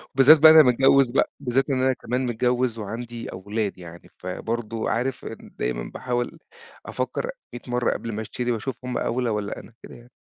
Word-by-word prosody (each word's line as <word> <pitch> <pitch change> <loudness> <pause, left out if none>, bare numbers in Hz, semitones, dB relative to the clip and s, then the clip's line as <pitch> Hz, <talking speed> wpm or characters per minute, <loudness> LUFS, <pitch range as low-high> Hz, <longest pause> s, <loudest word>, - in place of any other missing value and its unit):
وبالذات 140 +4 +8
بقى 160 +1 +9
أنا 160 -1 +9
متجوِّز 135 0 +4
بقى، 135 - +1
بالذات 135 0 0
إن 130 -2 +1
أنا 130 0 +3
كمان 125 +1 -3
متجوِّز 125 0 0
وعندي 115 +2 -6
أولاد. 105 +2 -3
يعني 85 -1 -12
فبرضه 115 +4 -4
عارف، 125 +3 -2 0.2
دايمًا - - -4
باحاول 125 +5 -3 0.5
أفكَّر 475 - -3 0.2
ميِّة 120 - -7
مرة 125 -1 0
قبل 115 - -4
ما 110 - -3
أشتري 120 +3 -3
وأشوف 125 +3 -4
هُم 125 -1 -2
أولى 125 0 -1
والّا 105 -2 -3
أنا، - - -15
كده - - -11
يعني. 120 +1 -16
120 Hz, 175 wpm, -24 LUFS, 110-130 Hz, 0.5 s, بقى